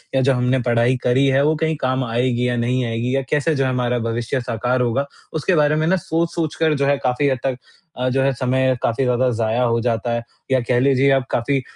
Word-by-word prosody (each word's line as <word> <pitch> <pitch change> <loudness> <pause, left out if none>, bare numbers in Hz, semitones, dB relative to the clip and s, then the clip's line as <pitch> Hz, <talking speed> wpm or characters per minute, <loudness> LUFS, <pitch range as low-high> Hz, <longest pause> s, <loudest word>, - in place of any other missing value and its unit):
या 130 - +3
जो 135 +1 +3
हमने 125 +1 +1
पढ़ाई 120 +2 +2
करी 125 +3 +3
है 135 +1 +3
वो 155 +1 +2
कहीं 160 +1 -1
काम 130 0 0
आएगी 120 +1 0
या 120 - 0
नहीं 125 +1 0
आएगी 115 +3 -2
या 135 - +1
कैसे 150 +2 +1
जो 135 - +1
है 130 - 0
हमारा 125 -1 0
भविष्य 115 +3 -2
साकार 125 +1 -1
होगा? 125 +3 0 0.3
उसके 160 +4 0
बारे 150 -1 +3
में 155 +1 0
ना 190 - +3
सोच-सोच 165 -2 -2
कर 160 -1 +1
जो 140 -1 0
है 140 0 +2
काफ़ी 125 +3 +1
हद 130 - 0
तक 130 -2 -1 0.4
अ, 130 0 0
जो 135 +1 0
है 135 0 +2
समय 130 +1 +1
काफ़ी 120 +3 0
ज़्यादा 125 0 +1
ज़ाया 115 +2 0
हो 115 -1 +1
जाता 120 0 -1
है 120 0 -2 0.3
या 130 - +4
कह 120 +1 0
लीजिए 135 +1 +3
आप 135 -2 +2
काफ़ी 135 +3 0
130 Hz, 240 wpm, -20 LUFS, 120-140 Hz, 0.4 s, या